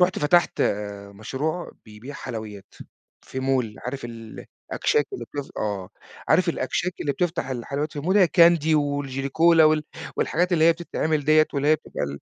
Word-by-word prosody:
رُحت 180 0 +3
فتَحت 165 +3 +2
آآ، 100 -1 -2
مشروع 140 - -4
بيبيع 110 +6 -11
حلويات 110 -7 -8 0.5
في 130 - -6
mall. 130 -5 0
عارِف 135 0 -5
ال 115 -2 -9 0.2
الأكشاك 450 -1 +1
اللي 390 - -5
بت 145 -1 -5
آه، 100 -3 -3 0.4
عارِف - - +4
الأكشاك 180 +1 -1
اللي 145 - 0
بتفتَح 170 -4 -2
الحلويات 140 +5 -3
في 145 - -5
mall؟ 185 +6 +1
هي 185 -4 +6
candy 165 -2 +6
والJelly 140 -2 -2
Cola 165 +3 +4
وال 155 -1 +4 0.3
والحاجات 180 +3 0
اللي 160 -2 +4
هي 165 - +7
بتتعمَل 160 -3 -2
ديّة، 155 +1 +5
واللي 140 +1 +1
هي 155 - +6
بتبقى - - -5
ال 70 0 -6
145 Hz, 170 wpm, -24 LUFS, 120-165 Hz, 0.5 s, هي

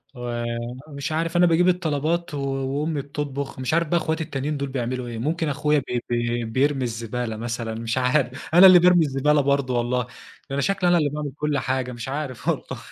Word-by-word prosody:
ومش 120 +4 -5
عارف 165 +2 -1
أنا 175 - +6
باجيب 175 +2 +3
الطلبات 165 -1 -1
و - - -3
وأمي 140 +3 -2
بتطبُخ، 140 -1 -5
مش 130 +4 -2
عارف 170 -1 +2
بقى 170 - +2
إخواتي 160 0 -1
التانيين 145 0 -3
دول 140 -1 -3
بيعملوا 125 -1 -3
إيه. 115 -1 -6
ممكن 160 +4 -1
أخويا 150 +1 +1
ب 125 -2 -3
بي 120 0 -1
بيرمي 135 +3 +1
الزبالة 115 -1 -3
مثلًا، 115 -1 -4
مش 115 +2 -3
عارف، 125 0 0
أنا 185 +2 +10
اللي 180 -1 +9
بارمي 175 -2 +5
الزبالة 145 +2 +2
برضه 140 -3 +1
والله، 125 +1 0
ده 125 - -15 0.4
أنا 140 0 0
شكلي 195 0 +1
أنا 175 - +5
اللي 150 -3 +2
باعمل 150 -1 -4
كل 150 -1 0
حاجة، 130 -1 -1
مش 120 +1 -6
عارف 140 -3 -5
والله. - - -2
140 Hz, 195 wpm, -23 LUFS, 125-155 Hz, 0.4 s, أنا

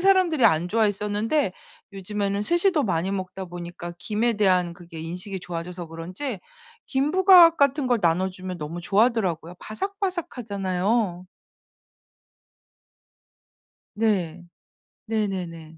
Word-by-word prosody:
사람들이 370 -7 +4
안 160 +2 +4
좋아했었는데 210 +3 +1 0.4
요즘에는 200 +1 -2
스시도 345 - +2
많이 185 -2 -1
먹다 190 0 -4
보니까 175 -1 -7
김에 215 +6 0
대한 185 -5 +2
그게 170 -2 -11
인식이 180 +4 -5
좋아져서 175 0 -6
그런지 180 - -6 0.5
김부각 335 +4 +6
같은 280 -1 +2
걸 245 -2 +2
나눠주면 185 +2 -1
너무 160 +3 -5
좋아하더라고요. 195 -4 +1
바삭바삭하잖아요. 215 - -2 2.7
네. 185 -6 0 0.6
네네네. 180 -7 -3
195 Hz, 275 characters per minute, -24 LUFS, 175-240 Hz, 2.7 s, 김부각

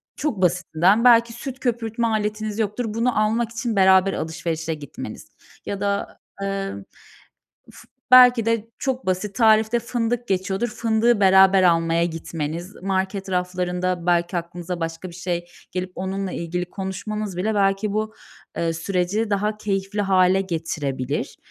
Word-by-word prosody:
Çok 260 -11 -2
basitinden 180 +3 +2
belki 235 -1 +5
süt 260 +2 -7
köpürtme 235 -2 -1
aletiniz 215 0 -2
yoktur. 220 +3 -1
Bunu 235 0 +1
almak 225 +2 0
için 230 -1 -3
beraber 190 0 +5
alışverişe 160 0 -3
gitmeniz 145 -3 -8 0.4
ya 200 0 -4
da, 200 0 -2 0.3
emm. 195 - -3 0.8
Uf - - -15 0.3
belki 250 -2 +8
de 230 -1 0
çok 260 -6 -2
basit 190 +2 -1
tarifte 220 0 +4
fındık 240 0 -2
geçiyordur, 190 +4 -1
fındığı 225 0 +1
beraber 190 0 +6
almaya 165 -1 +3
gitmeniz, 165 +2 -5
market 195 +1 -2
raflarında 180 -1 -1
belki 175 0 +1
aklınıza 175 +1 -5
başka 165 +2 -4
bir 170 - -12
şey 175 -1 -3 0.3
gelip 180 0 -3
onunla 190 0 -3
ilgili 175 +1 -3
konuşmanız 200 +1 -4
bile 215 +5 -1
belki 195 +1 +1
bu, 215 +1 -2 0.4
eee, 165 -1 0
süreci 185 +6 -1
daha 210 +1 0
keyifli 200 0 -2
hâle 190 -1 +3
getirebilir, 150 -7 -3
195 Hz, 135 wpm, -22 LUFS, 180-220 Hz, 0.8 s, belki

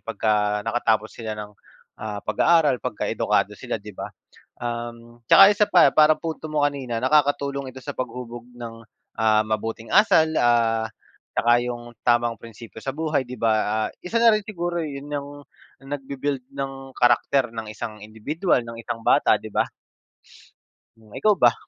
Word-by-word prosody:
pagka 105 -1 0
nakatapos 115 -2 0
sila 110 -2 -6
ng, 105 0 -8 0.5
ah, 105 -1 -4
pag-aaral, 145 +4 +3
pagka 125 -4 -4
edukado - - 0
sila, - - -4
'di 105 +1 -11
ba? - - -6 0.5
Um, 120 0 -6
tsaka 195 - +10
isa 210 - +4
pa, - - +7
parang 155 0 +5
punto 160 -1 -5
mo 145 -1 +2
kanina, 130 -5 -4
nakakatulong 140 0 +1
ito 130 - -11
sa 145 +2 -7
paghubog 120 -1 -6
ng, 115 -1 -9 0.3
ah, 110 -1 +3
mabuting 110 +1 -3
asal, 190 -6 +5
ah, 115 -3 +2 0.4
tsaka 120 +1 +3
yung 120 -1 -6
tamang 120 -1 +2
prinsipiyo 115 0 -12
sa 135 - -2
buhay, 155 -1 -1
'di 125 -1 -9
ba? 110 -1 +1
Ah, - - -8
isa 230 +6 -1
na 230 -2 +6
rin 215 - -2
siguro 175 -5 -3
yun 140 -2 -6
yung, 145 -1 -4 0.5
nagbi-build 135 -1 -4
ng 135 -1 -6
karakter 120 +1 +3
ng 110 -1 -5
isang 110 -1 -7
indibidwal, 125 - -1
ng 115 - -8
isang 115 - -4
bata, - - +4
'di - - -9
ba? - - +3 1.3
Hmm, 110 -2 -21
ikaw 210 -2 +2
ba? 120 -5 +5
120 Hz, 160 wpm, -23 LUFS, 115-145 Hz, 1.3 s, tsaka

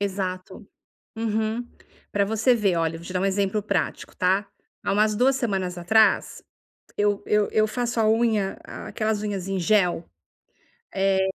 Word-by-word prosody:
Exato. 190 0 -4 0.5
Uhum. 220 +1 -1 0.4
Pra 200 0 +2
você 225 +4 +2
ver, 200 -6 +1
olha, 165 0 0
vou 170 - -12
te 185 - -7
dar 180 - 0
um - - +1
exemplo 195 +1 0
prático, 195 -5 -2
tá, 190 +2 +1 0.4
há - - 0
umas 215 +1 +2
2 255 +4 +3
semanas 195 -8 -2
atrás, 220 +6 +2 0.5
eu 205 -1 +1
eu 210 -1 +2
eu 215 0 +3
faço 240 +1 -1
a 215 - +3
unha 220 -4 +1
a - - -8
aquelas 215 -1 -1
unhas 200 -3 -3
em 195 -1 -1
gel, 180 -2 +2 0.9
eh, 190 0 +2
205 Hz, 160 wpm, -24 LUFS, 190-220 Hz, 0.9 s, 2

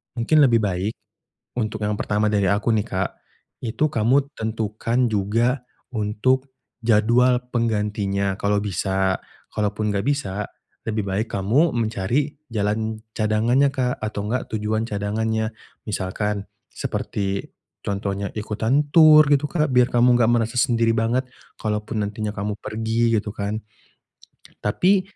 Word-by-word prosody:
Mungkin 125 +6 +3
lebih 120 -6 +5
baik, 95 +2 -1 0.7
untuk 110 -1 -2
yang 105 0 0
pertama 105 +1 +1
dari 100 -2 +2
aku 105 +4 +1
nih, 105 -1 +1
Kak, 95 -2 -1 0.6
itu 120 +7 +1
kamu 135 +6 +2
tentukan 110 +2 -1
juga 115 +6 +1 0.3
untuk 130 +5 0 0.3
jadwal 120 +3 +4
penggantinya 105 -4 0
kalau 100 0 +1
bisa. 95 -1 0 0.3
Kalaupun 105 0 -1
nggak 100 +1 -1
bisa 105 -9 -1 0.4
lebih 110 -1 -1
baik 100 +4 -1
kamu 125 - +2
mencari 115 +6 0
jalan 110 0 -1 0.2
cadangannya, 115 +6 +3
Kak, 125 -2 -1
atau 105 -1 -3
nggak 125 +2 -1
tujuan 110 +1 -1
cadangannya. 110 +1 -1 0.4
Misalkan 100 +1 -2 0.3
seperti 100 -1 -3 0.3
contohnya 100 0 -2
ikutan 110 +7 0
tur 155 -2 +8
gitu, 145 0 +3
Kak, 155 -1 +1
biar 125 -1 +5
kamu 120 +1 +4
nggak 120 -2 +3
merasa 115 0 +1
sendiri 115 -1 +3
banget 115 +3 +1 0.3
kalaupun 105 0 -2
nantinya 105 +1 -3
kamu 105 +1 -3
pergi 115 +2 0
gitu 105 0 -3
kan. 105 +2 -3 1.0
Tapi, 185 - +3
110 Hz, 125 wpm, -23 LUFS, 105-120 Hz, 1.0 s, tur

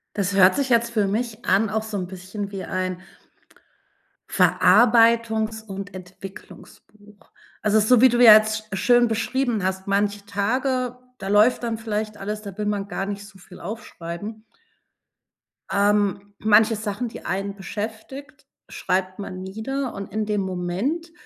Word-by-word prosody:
Das 200 -1 -1
hört 190 +5 +6
sich 275 -2 0
jetzt 235 -1 +2
für 215 -4 +1
mich 225 +2 -3
an 200 +3 +2
auch 220 +1 -1
so 220 -1 -6
'n 185 -2 -3
bisschen 190 +2 -7
wie 195 -1 -5
ein 185 -1 -3 1.3
Verarbeitungs 225 +1 +4
und 200 -1 -8
Entwicklungsbuch. 195 +2 -13 0.3
Also 215 0 +3
so, 225 +3 +4
wie 260 - +8
du 240 0 +2
ja 225 -3 +11
jetzt 215 0 +2
schön 240 +4 +4
beschrieben 230 -1 -1
hast, 190 +1 -2
manche 200 0 0
Tage, 250 +5 -1 0.2
da 195 - -6
läuft 210 +5 +4
dann 230 -1 -2
vielleicht 215 -1 -3
alles, 210 +2 -5
da 200 -2 -9
will 210 - -2
man 205 -1 -2
gar 195 -1 -3
nicht 200 0 -6
so 195 -2 -16
viel 180 0 -15
aufschreiben. 205 +1 -7 1.3
Ähm, 205 0 +1
manche 220 +1 +4
Sachen, 215 +3 -3
die - - -11
einen 195 +2 -3
beschäftigt, 220 +7 -7 0.2
schreibt 185 +1 -2
man 185 -2 -6
nieder 240 +7 -4
und 195 -1 -7
in 215 0 -1
dem 210 -1 0
Moment 195 - -3
210 Hz, 150 wpm, -23 LUFS, 195-225 Hz, 1.3 s, ja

